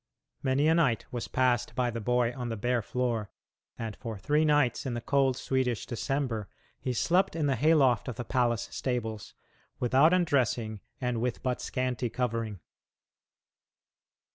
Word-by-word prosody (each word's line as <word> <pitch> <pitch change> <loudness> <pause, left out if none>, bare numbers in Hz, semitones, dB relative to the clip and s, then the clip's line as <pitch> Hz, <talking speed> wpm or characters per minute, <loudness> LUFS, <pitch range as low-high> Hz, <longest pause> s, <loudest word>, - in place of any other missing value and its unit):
Many 135 +3 +2
a 160 - +5
night 140 -9 +2
was 120 -2 -4
passed 125 -2 +1
by 125 -2 +1
the 115 0 -4
boy 125 +1 +1
on 125 -2 -4
the 115 - -3
bare 120 +3 +1
floor, 115 -2 -2 0.5
and 115 -2 -5
for 115 -3 -6
three 150 +10 +2
nights 145 -5 +2
in 120 - -2
the - - -2
cold 135 +1 +2
Swedish 130 -4 -1
December 120 -4 -2 0.3
he 130 - -2
slept 175 +10 +2
in 160 -2 0
the 140 -2 +2
hay 155 +7 +4
loft 130 -7 +3
of 125 - -4
the 120 - -5
palace 120 -3 +1
stables, 115 -5 -3 0.4
without 130 +6 +4
undressing 125 - +1 0.2
and 125 -3 -1
with 125 -1 -2
but 125 -1 -1
scanty 125 -2 -2
covering. 115 -4 -2
125 Hz, 160 wpm, -29 LUFS, 115-135 Hz, 0.5 s, a